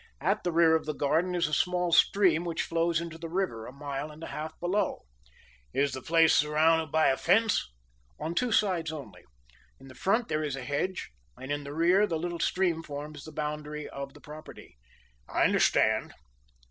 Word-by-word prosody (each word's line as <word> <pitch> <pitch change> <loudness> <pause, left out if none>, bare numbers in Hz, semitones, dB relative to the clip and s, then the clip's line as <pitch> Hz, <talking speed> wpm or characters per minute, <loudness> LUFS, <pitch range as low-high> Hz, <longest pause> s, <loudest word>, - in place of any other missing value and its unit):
At 195 +8 0
the 175 - 0
rear 165 -1 +5
of 160 - -2
the 155 - -2
garden 160 +6 +1
is 175 -3 +1
a 150 - -6
small 180 0 +1
stream, 175 -2 +4
which 170 -2 -2
flows 165 0 0
into 165 -1 -7
the 165 0 -6
river 165 -11 -2
a - - -8
mile 140 +1 -5
and 155 +2 -12
a - - -7
half 155 +1 -6
below." 185 +4 -1 0.7
"Is 140 +1 +2
the 130 - -5
place 165 +1 +4
surrounded 155 +1 +3
by 160 0 +4
a 135 - +1
fence?" 200 - +2 0.5
"On 165 - -3
two 245 +6 0
sides 180 -7 +1
only. 140 -9 -9 0.5
In 135 0 -14
the - - -11
front 220 - +1
there 155 0 -1
is 145 -3 -2
a 135 - -6
hedge 145 +8 -3 0.3
and 130 +2 -7
in 145 0 -2
the 140 +1 -7
rear 180 +6 +4
the 165 - -1
little 175 +1 -4
stream 175 -3 +1
forms 150 -1 -8
the 155 - -9
boundary 150 0 -4
of 140 0 -7
the - - -14
property." 150 - -12 0.5
"I - - +1
understand." - - +3
160 Hz, 195 wpm, -29 LUFS, 150-175 Hz, 0.7 s, rear